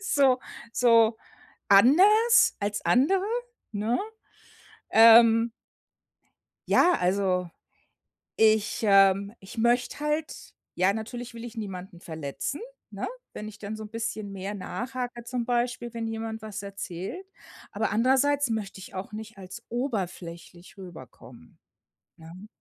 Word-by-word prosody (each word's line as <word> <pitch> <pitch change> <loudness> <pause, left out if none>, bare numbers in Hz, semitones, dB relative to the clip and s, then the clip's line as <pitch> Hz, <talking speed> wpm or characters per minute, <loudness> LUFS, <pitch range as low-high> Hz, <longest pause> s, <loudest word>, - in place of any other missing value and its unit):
so 275 -10 +3 0.3
so 230 -2 +4 0.5
anders 380 - +6
als 205 0 -2
andere,“ 370 +11 +3 0.5
ne, 215 +4 -1 0.9
ähm 230 0 +7 1.2
ja, 360 - +5
also, 180 -1 0 0.9
ich, 220 -1 +3
ähm 195 -1 +4
ich 190 +4 -13
möchte 240 +4 +1
halt 300 +1 -3 0.2
ja, 185 +2 +3
natürlich 235 +3 -6
will 230 0 -8
ich 240 0 -9
niemanden 190 -3 -7
verletzen, 160 - -5 0.3
ne? - - -5 0.3
Wenn 210 - -7
ich 210 -1 -10
dann 215 +1 -5
so 215 0 -7
bisschen 220 -2 -5
mehr 195 +1 -5
nachhake 245 +4 -5
zum 240 0 -3
Beispiel, 240 0 -2
wenn 230 -1 -3
jemand 225 0 -5
was 215 -1 -6
erzählt. 200 - -6 0.5
Aber 215 +2 -2
andererseits 265 +4 +2
möchte 210 -3 -4
ich - - -11
auch 190 +3 -6
nicht 220 0 -9
als 190 +5 -10
oberflächlich 185 -8 -5
rüberkommen, 130 - -13 0.6
ne? 170 +5 -12
220 Hz, 115 wpm, -26 LUFS, 195-240 Hz, 1.2 s, ähm